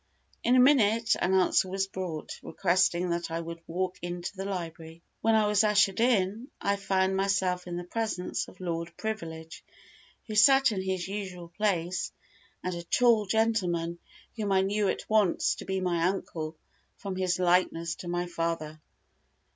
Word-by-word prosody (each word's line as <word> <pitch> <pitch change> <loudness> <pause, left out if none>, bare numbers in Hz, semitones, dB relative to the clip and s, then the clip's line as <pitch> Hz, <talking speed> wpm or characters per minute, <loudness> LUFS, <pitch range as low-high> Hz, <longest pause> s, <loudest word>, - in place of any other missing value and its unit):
In 245 - +4
a - - +6
minute, 230 -4 +4
an 185 +2 +2
answer 185 0 +3
was 195 +1 0
brought, 185 -5 -6
requesting 180 -1 +1
that 170 0 -2
I 165 0 -2
would 165 0 -7
walk 185 +2 -3
into 175 +3 -5
the 195 0 -5
library. 165 -3 -6 0.2
When 225 0 +3
I 215 -1 +4
was 210 0 +3
ushered 210 -2 +3
in, 225 -1 +1
I 200 0 0
found 190 -1 +1
myself 190 -2 0
in 175 -1 -4
the 175 - -4
presence 215 -1 -3
of - - -15
Lord 170 -2 -4
Privilege, 165 -7 -6 0.6
who 220 - -6
sat 270 +5 +6
in 195 -3 -2
his 190 -2 -2
usual 190 -4 -6
place, 180 -2 -1 0.5
and 185 - -2
a 170 - -4
tall 220 +3 +3
gentleman, 180 -6 0 0.4
whom 210 -3 -2
I 190 -1 +4
knew 200 +1 +1
at - - -2
once 215 -5 +2
to - - -9
be 190 0 -1
my 175 -2 0
uncle, 160 -4 -4 0.4
from 195 -2 -5
his 185 -1 0
likeness 175 -2 +2
to 175 - -8
my 175 0 -1
father. 165 -3 -3
185 Hz, 165 wpm, -28 LUFS, 175-205 Hz, 0.6 s, a